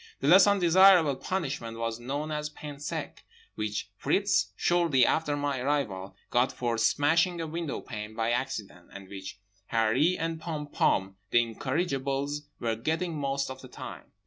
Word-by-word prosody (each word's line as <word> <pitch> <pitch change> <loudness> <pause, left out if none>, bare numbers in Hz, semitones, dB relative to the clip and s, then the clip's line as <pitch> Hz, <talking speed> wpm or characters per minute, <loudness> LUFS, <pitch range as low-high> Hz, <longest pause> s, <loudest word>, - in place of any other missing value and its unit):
The 135 - -1
less 190 +6 +8
undesirable 185 -5 +6
punishment 135 -8 -3
was 115 0 -3
known 140 +5 -4
as 150 0 -2
pain 150 -1 -9
sec—which 105 -6 -6
Fritz, - - +1
shortly 170 -7 +3
after 150 -2 +1
my 145 -2 -1
arrival, 125 -9 -2 0.2
got 125 +1 +3
for 120 -2 -2
smashing 165 +8 +2
a 165 - -2
window 160 -1 -4
pane 105 -2 -7
by 115 +1 0
accident; 110 -8 -3
and 100 -1 -10
which 95 -1 -8 0.3
Harree 120 +10 +3
and 165 -1 -3
Pom 155 -3 -4
Pom, 95 -9 0
the 120 +3 +4
incorrigibles, 140 - -2
were 115 -1 -1
getting 160 +8 -2
most 140 -2 -1
of 130 0 -9
the 130 - -10
time. - - -9
140 Hz, 150 wpm, -28 LUFS, 115-160 Hz, 0.3 s, less